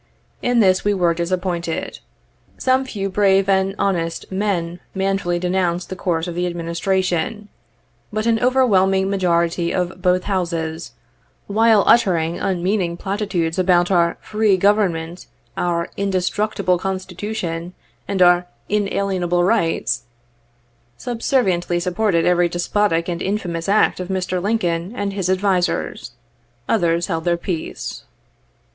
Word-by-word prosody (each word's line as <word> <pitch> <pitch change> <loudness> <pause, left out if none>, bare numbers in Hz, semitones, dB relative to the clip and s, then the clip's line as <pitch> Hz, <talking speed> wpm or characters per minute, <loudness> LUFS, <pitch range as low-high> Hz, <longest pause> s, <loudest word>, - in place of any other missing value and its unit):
In 245 -1 +2
this 190 -2 +3
we 205 0 +1
were 175 -3 +2
disappointed. 170 -1 -3 0.6
Some 260 +1 +2
few 200 -6 -3
braye 195 0 +3
and 195 0 +2
honest 170 -4 -2
men 185 -3 -1 0.2
manfully 195 -2 0
denounced 180 0 -1
the - - -3
course 170 -2 -1
of 175 - -4
the 175 +1 -1
Administration, 180 +3 -1 0.6
but 215 +1 -2
an 230 -1 +2
overwhelming 195 -7 +3
majority 170 -2 +1
of 180 0 -2
both 180 0 +2
Houses, 170 -4 -3 0.5
while 220 0 +4
uttering 170 -7 +3
unmeaning 180 -1 -1
platitudes 190 -4 -2
about 180 0 +3
our 170 -2 +2
"free 210 -2 +2
Government," 180 -4 +1 0.3
our 170 -1 -1
"indestructible 195 -1 0
constitution," 185 -2 -4 0.3
and 190 -2 +2
our 175 0 +4 0.2
"inalienable 195 -4 0
rights," 180 - 0 0.9
subserviently 195 - 0
supported 180 -1 +1
every 175 -1 +3
despotic 175 0 0
and 175 -1 -3
infamous 180 -4 -2
act 205 -1 +3
of 180 - -4
Mr. 185 -1 -2
Lincoln 180 -3 -1
and 200 -3 -2
his 190 -2 -2
advisers. 185 -9 0 0.5
Others 170 -5 +1
held 165 -3 -3
their 170 0 +1
peace. 170 -2 -5
185 Hz, 120 wpm, -20 LUFS, 175-200 Hz, 0.9 s, while